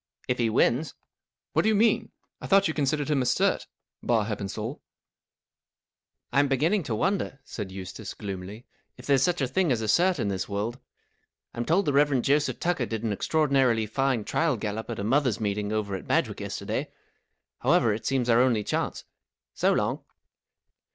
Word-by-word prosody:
" - - -32
If 125 - -1
he 115 -1 +2
wins." 125 +6 +1 0.3
" - - -66
What - - +4
do 220 - +2
you 220 - +3
mean? 225 +2 +2 0.3
I - - -6
thought 195 0 +5
you 160 - -1
considered 150 0 0
him 140 -3 +2
a - - 0
cert, 125 - +1 0.3
bar 115 -3 +1
Heppenstalt." 105 +4 -4 1.5
(i 135 - +4
I'm 145 - +4
beginning 155 +10 +2
to 115 - -2
wonder," 185 - -1
said 100 -4 -6
Eustace, 95 +2 -7
gloomily, 100 +2 -7 0.2
" - - -49
if 125 - -12
there's 140 -2 +3
such 175 +1 +1
a 135 - +1
thing 170 +4 +1
as 120 - +1
a 110 - -2
cert, 175 - +3
in 115 - -1
this 95 0 -3
world. 105 +5 -3 0.7
I'm 120 - -3
told 180 +7 +2
the 145 - +1
Rev, 145 -1 +3
Joseph 145 +1 +1
Tucker 170 -9 0
did 110 -1 -4
an 110 -3 0
extraordinarily 135 -3 +2
fine 130 +1 0
trial 155 +3 0
gallop 110 +2 -4
at 115 - -4
a 100 - -3
mothers' 125 0 +1
meeting 105 -1 -2
over 105 -2 -2
at 95 - -5
Badg - - +2
wick - - -8
yesterday. - - -4 0.7
However, 125 -5 +3
it 110 - -4
seems 130 -3 +1
our 120 0 +5
only 120 -5 +2
chance. - - -2 0.5
So - - +2
Iong." - - -1
125 Hz, 190 wpm, -27 LUFS, 110-145 Hz, 1.5 s, thought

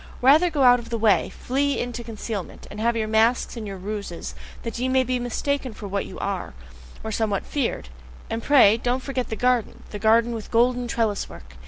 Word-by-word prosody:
Rather 305 +7 +6
go 295 -4 +1
out 245 -1 +7
of 235 - -10
the 230 - -1
way! 215 -2 +3
Flee 280 +2 -1
into 240 -1 -4
concealment! 220 -4 -6
And 210 - -8
have 230 +1 +1
your 220 -1 -1
masks 225 +4 +2
and 225 -3 -6
your 195 -1 -6
ruses, 200 -2 -5 0.3
that 230 0 -4
ye 255 +1 0
may 260 0 +3
be 255 0 -1
mistaken 255 +1 -2
for 205 - -7
what 200 0 -2
you - - -9
are, 195 - -4 0.5
or 220 - -4
somewhat 215 -2 -1
feared! 245 - -2 0.4
And 225 0 -3
pray, 230 -6 +6
don't 245 +2 -1
forget 260 -3 -3
the 220 - -2
garden, 250 -1 0
the 210 - -5
garden 230 +2 +3
with 225 -2 -6
golden 245 +1 +2
trellis 225 -3 -1
work! 65 0 -13
230 Hz, 205 wpm, -24 LUFS, 215-250 Hz, 0.5 s, out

